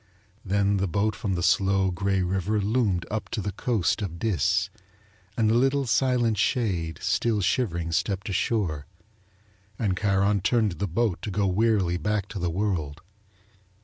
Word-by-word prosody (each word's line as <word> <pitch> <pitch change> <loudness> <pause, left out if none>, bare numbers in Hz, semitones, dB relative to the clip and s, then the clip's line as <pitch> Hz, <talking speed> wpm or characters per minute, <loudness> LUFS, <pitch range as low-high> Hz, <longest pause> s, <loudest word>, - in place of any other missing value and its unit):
Then 100 0 +1
the 95 0 0
boat 105 +4 0
from 100 -6 -2
the 85 - -2
slow, 95 +1 +2
grey 95 +1 0
river 95 +4 0
loomed 100 -4 0
up 110 0 -3
to 115 - -3
the 100 0 -2
coast 110 0 0
of 90 -5 -4
Dis 90 -7 0 0.7
and 110 -2 +3
the 110 - +3
little, 135 +3 +2
silent 120 0 +1
shade 90 -10 0
still 105 +4 +1
shivering 85 -5 0
stepped 95 +4 -1
ashore, 95 -7 -1 0.9
and 100 -5 0
Charon 100 0 +1
turned 105 -3 +1
the 100 - -1
boat 105 +1 -1
to - - -4
go 100 +1 0
wearily 95 -2 +2
back 105 +1 -1
to 100 - -5
the 90 -1 -1
world. 80 -5 -2
100 Hz, 155 wpm, -26 LUFS, 90-110 Hz, 0.9 s, and